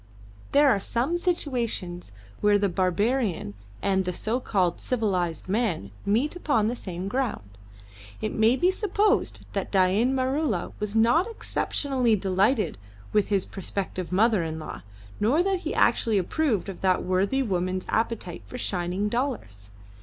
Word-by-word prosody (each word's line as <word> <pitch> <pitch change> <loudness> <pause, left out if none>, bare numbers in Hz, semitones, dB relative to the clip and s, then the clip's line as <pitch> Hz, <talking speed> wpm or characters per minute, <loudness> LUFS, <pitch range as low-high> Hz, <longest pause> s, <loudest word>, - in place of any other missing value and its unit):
There 290 +1 +5
are 220 -7 +4
some 255 - -1
situations 235 - -2 0.3
where 205 0 +4
the 200 -1 +1
barbarian 190 - 0 0.3
and 190 -1 +2
the, 180 - -2
so 225 +7 -1
called, 185 -8 0
civilised 185 -10 -1
man 190 - -1 0.2
meet 240 - +1
upon 285 -11 +1
the 240 - -2
same 185 -4 -5
ground. 215 - -2 0.7
It 215 - -3
may 220 +3 +4
be 355 +7 +3
supposed 415 +2 +1
that - - -3
Dain 200 +7 +3
Maroola 260 - 0
was 210 0 -3
not 240 - +4
exceptionally 270 - 0
delighted 195 - +1 0.3
with 210 -2 +3
his 200 -3 +1
prospective 185 -2 -4
mother 210 +1 +3
in 160 -1 -3
law, 155 - -7 0.4
nor 260 +11 +3
that 385 -1 +1
he - - -4
actually 225 -3 +3
approved 220 - 0
of 195 - -7
that 185 -1 +2
worthy 195 +9 +1
woman's 185 -3 -1
appetite 225 -6 -2
for 250 - -7
shining 185 -2 -1
dollars. 210 - -3
210 Hz, 145 wpm, -26 LUFS, 185-255 Hz, 0.7 s, There